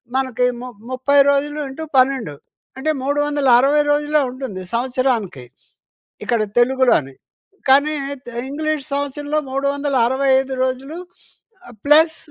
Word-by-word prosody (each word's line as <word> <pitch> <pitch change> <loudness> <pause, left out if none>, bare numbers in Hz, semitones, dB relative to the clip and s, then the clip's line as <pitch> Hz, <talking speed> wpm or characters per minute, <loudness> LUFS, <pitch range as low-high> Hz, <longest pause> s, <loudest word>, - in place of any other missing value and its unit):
మనకి 260 -2 0 0.2
ము 255 - -7 0.2
ముప్పై 260 +3 +1
రోజులు 290 +1 0
ఇంటూ 270 +4 -7
12 255 - +1 0.4
అంటే 305 +4 -1
360 285 -1 +3
రోజులే 295 +1 +1
ఉంటుంది 250 -7 -7
సంవత్సరానికి. 240 - -1 0.8
ఇక్కడ 235 -3 0 0.2
తెలుగులోని. 240 - +2 0.6
కానీ, 285 +3 +4 0.3
తె 240 - -9 0.2
ఇంగ్లీష్ 310 0 -2
సంవత్సరంలో 290 +2 -2
365 270 -1 +1
రోజులు 260 +5 -3 0.7
ఆహ్, - - -13
ప్లస్ 315 +2 +5
270 Hz, 100 wpm, -19 LUFS, 255-290 Hz, 0.8 s, ప్లస్